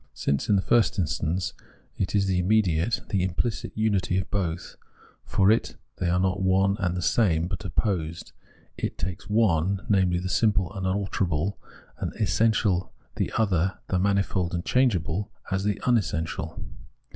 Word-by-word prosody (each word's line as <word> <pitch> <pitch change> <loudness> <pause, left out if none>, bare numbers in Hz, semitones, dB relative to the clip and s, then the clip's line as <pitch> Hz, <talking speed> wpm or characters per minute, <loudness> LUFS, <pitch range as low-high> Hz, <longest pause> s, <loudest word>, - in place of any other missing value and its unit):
Since, 70 +7 -1
in 105 - +5
the 95 - +1
fixst 120 -2 +3
instance, 90 0 -1 0.4
it 95 +2 -2
is 100 -1 +3
the 95 -2 +1
immediate, 95 0 +2
the 100 -3 +1
imphcit 110 +6 -2
unity 100 -4 +1
of 95 - -3
both, 90 -4 -2
while - - -34 0.3
for 95 +2 +3
it 110 - +1 0.2
they 90 - 0
are 90 +1 +2
not 95 +1 0
one 95 +1 +3
and 90 -3 0
the 90 - -2
same, 85 -8 +2
but 90 -1 -5
opposed, 85 -6 -2 0.5
it - - -3
takes 90 +2 -5
one, 100 -3 +2
namely, 95 -4 +3
the 90 +1 -3
simple 95 -2 +1
unalterable, 95 -3 -1 0.4
as - - -1
essential, 105 -2 +1 0.3
the - - -1
other, 95 -4 +1
the 90 - +1
manifold 95 -2 +1
and 85 - -3
changeable, 105 -5 +1 0.2
as 95 +1 0
the 105 -1 +1
rmessential. 80 - -1
95 Hz, 155 wpm, -26 LUFS, 90-105 Hz, 0.5 s, in